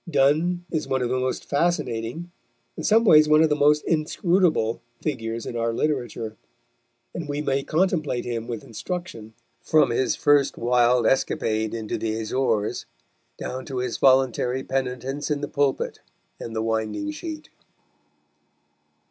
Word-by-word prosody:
Donne 170 +5 +2
is 155 -2 -2
one 130 -1 0
of 120 - -1
the 130 +1 0
most 130 0 -2
fascinating, 145 -1 -1 0.4
in - - -6
some 225 +2 +4
ways 155 -6 +7
one 155 +1 +6
of 160 - +3
the 150 - +2
most 150 +1 +3
inscrutable, 165 - +1 0.2
figures 115 -6 -3
in - - -5
our 115 0 0
literature, 120 -6 -2 0.8
and 160 -4 -6
we 145 0 -2
may 140 -2 0
contemplate 155 -5 0
him 115 -1 -4
with 115 -3 -5
instruction 115 - -6 0.3
from 155 -6 +3
his 130 +2 +1
first 145 -2 +3
wild 120 0 +3
escapade 110 -3 0
into 110 -2 -4
the 110 0 -2
Azores 110 -2 -1 0.5
down 130 +1 -5
to 135 - -6
his 125 -1 -2
voluntary 130 -1 +3
penitence 135 +2 -3
in 145 -1 -1
the 145 - -2
pulpit 140 -2 -1 0.4
and 115 - -7
the 110 - -1
winding 110 - -2
sheet. 310 0 -7
135 Hz, 145 wpm, -24 LUFS, 115-155 Hz, 0.8 s, ways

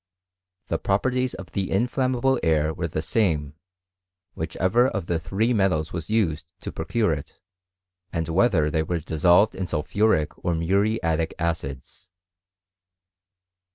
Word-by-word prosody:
The - - 0
properties 125 +5 0
of 95 - -10
the 95 -1 -2
inflammable 130 +4 +1
air 80 -1 +2
wer^ 85 +1 -3
the 75 0 -3
same, 80 -6 0 0.8
whichever 115 +8 +1
of 100 -9 -3
the 85 -1 -1
three 100 +9 0
metals 90 -6 +1
was 80 -2 -5
used 85 -7 0
to - - -5
procure 110 -8 0
it, 70 -2 -8 0.7
and 80 -2 -2
whether 85 -4 +2
they 80 - +1
were 85 +2 -2
dissolved 85 +7 +3
in 95 - -4
soli 75 - -1
phuric 100 -5 +2
or 85 - +1
muriatic 85 -2 0
acids. 80 0 -4
90 Hz, 130 wpm, -24 LUFS, 80-110 Hz, 0.8 s, dissolved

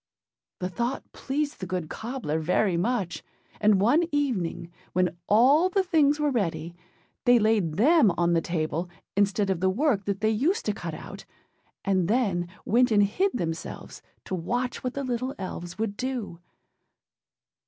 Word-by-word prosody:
â - - -66
The 180 - -1
thought 240 +7 -3
pleased 290 +2 -3
the 185 - -5
good 180 -3 -3
cobbler 220 - -3
very 180 +4 +1
much; 190 -1 -1 0.4
and 210 -2 +4
one 240 - +4
evening, 190 - -1 0.2
when 180 -1 +1
all 275 - +5
the 385 +1 +1
things 305 -5 +3
were 295 -1 +1
ready, 170 - -2 0.5
they 245 0 +6
laid 215 -7 +2
them 270 - +5
on 175 0 +2
the 165 - +3
table, 165 +1 -2 0.3
instead 200 0 +2
of 185 - -1
the 190 +1 +2
work 225 -1 +1
that 200 0 -2
they 220 0 +3
used 295 - 0
to - - 0
cut - - -6
out, - - -10 0.6
and 190 -3 +2
then 200 -6 +1 0.2
went 245 +3 +3
and 210 -2 +4
hid 375 - +1
themselves, 165 -4 -5 0.2
to - - -6
watch 245 +9 -2
what 255 0 -3
the 280 - -2
little 255 +2 -2
elves 175 -2 -6
would 215 -2 -2
do. 250 -8 -4
210 Hz, 165 wpm, -26 LUFS, 180-255 Hz, 0.6 s, they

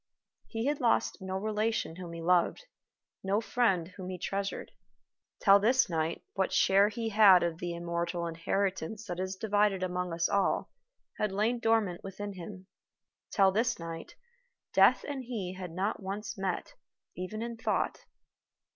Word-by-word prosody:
He 225 0 -3
had 290 +1 0
lost 230 -3 +1
no 190 0 -4
relation 215 -4 -1
whom 175 -2 -7
he 165 0 -7
loved, 180 - +2 0.6
no 195 +2 +1
friend 220 -7 +1
whom 185 -1 -8
he 185 - -4
treasured. 195 +2 -3 0.7
Till 200 -1 +8
this 240 0 +3
night, 160 0 -1
what 190 -1 0
share 200 +2 +4
he 225 +1 -3
had 200 -4 +7
of 170 -1 -2
the 175 -1 -3
immortal 170 0 -2
inheritance 190 +4 -2
that 175 -3 -5
is 190 +1 -2
divided 205 -1 +1
among 180 -1 -2
us 165 0 +1
all 200 -1 +1 0.5
had 210 -2 0
lain 220 +5 +1
dormant 225 -6 +1
within 200 +1 -6
him. 185 +1 -9 0.6
Till 195 -3 +4
this 230 +4 +1
night, 165 -1 -7 0.6
Death - - +5
and 275 -3 -4
he 205 -7 -4
had 185 -1 -6
not 195 +6 -2
once 205 +3 -5
met, 195 - -3 0.4
even 215 +5 -4
in 235 0 -4
thought. 225 - -1
195 Hz, 155 wpm, -30 LUFS, 180-215 Hz, 0.7 s, Till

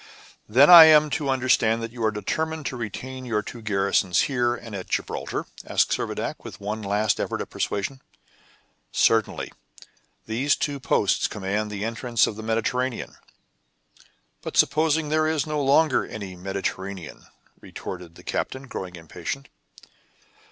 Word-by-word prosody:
"Then 130 +7 +6
I 170 -2 +12
am 155 -1 +6
to 145 -3 -1
understand 120 -3 +2
that 115 - -5
you 120 -1 -6
are 110 - +4
determined 155 +9 -3
to 130 - -3
retain 125 +3 -6
your 110 -4 -1
two 120 +3 -9
garrisons 100 -3 +1
here 120 -3 +1
and 115 -2 -10
at 95 -2 -6
Gibraltar?" - - -3 0.2
asked - - +1
Servadac, - - -3
with - - -9
one 105 +2 -4
last 105 +1 0
effort - - -2
at - - -6
persuasion. 130 +7 -3 0.9
"Certainly; 115 -2 +1 0.7
these 125 +6 +1
two 145 -1 -2
posts 100 -6 +1
command 105 +1 -3
the 105 0 -4
entrance 115 0 +1
of 105 - -4
the 110 - -7
Mediterranean." 115 +3 -2 1.2
"But - - -5
supposing 155 0 +3
there 155 +1 +2
is 155 -1 0
no 150 -2 -1
longer 150 +3 +4
any 100 -4 -7
Mediterranean?" 95 -1 -5 0.3
retorted 85 -2 -8
the - - -14
captain, 130 - -3
growing 90 -6 -6
impatient. 90 - -6
115 Hz, 145 wpm, -24 LUFS, 100-140 Hz, 1.2 s, I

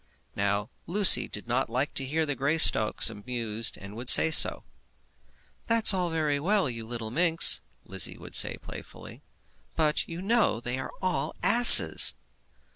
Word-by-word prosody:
Now 100 +1 -6 0.2
Lucy 195 +2 +4
did 105 - -11
not 120 +1 -5
like 130 +5 -6
to 135 - -5
hear 160 +3 -5
the 145 -2 -7
Greystocks 140 -5 0
abused, 115 0 -5
and 100 +2 -15
would 120 +3 -6
say 160 - +4
so. - - +2 1.0
"That's 230 -2 +2
all 180 -2 -5
very 155 -3 -5
well, 195 +3 -3
you 115 -3 -10
little 115 -2 -9
minx," 165 +4 +3 0.2
Lizzie - - 0
would - - -17
say - - +3
playfully, - - -15 0.5
"but 155 -1 -4
you 165 0 -11
know 215 - -3
that 115 - -13
they 125 +2 -8
are 130 - -10
all 185 -1 -5
asses!" 240 +3 +7
140 Hz, 155 wpm, -23 LUFS, 115-170 Hz, 1.0 s, asses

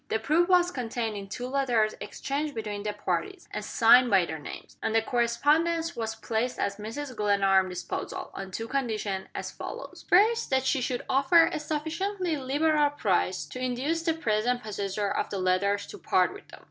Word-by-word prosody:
The 220 - +1
proof 310 +11 +2
was 360 -1 +4
contained 235 -5 -3
in 200 -1 -6
two 245 +5 -5
letters 250 -5 +1
exchanged 290 +1 -3
between 210 -2 -4
the 210 0 -2
parties, 390 - -3
and - - -4
signed 245 +2 +5
by 195 -4 +4
their 160 -2 -5
names; 145 - -9
and 220 - -1
the 225 - +5
correspondence 310 +9 +1
was 225 -1 -3
placed 225 +2 -2
at 200 0 -1
Mrs. 250 +5 -6
Glenarm's 195 -3 +3
disposal, 180 -1 -5
on 195 -1 -6
two 225 +4 -5
conditions, 220 -7 -2
as - - -4
follows: - - -8
First, 450 +5 +4
that 265 0 +1
she 265 0 +1
should 245 0 -2
offer 275 +5 +5
a - - -2
sufficiently 330 +4 -2
liberal 295 +2 +2
price 185 - 0
to 205 +12 -8
induce 260 +6 -1
the 325 -1 0
present 245 -3 0
possessor 205 -1 -2
of - - -1
the 200 - -3
letters 190 +2 +1
to 410 - -10
part - - +2
with - - -13
them. - - -13
245 Hz, 185 wpm, -28 LUFS, 210-300 Hz, -, signed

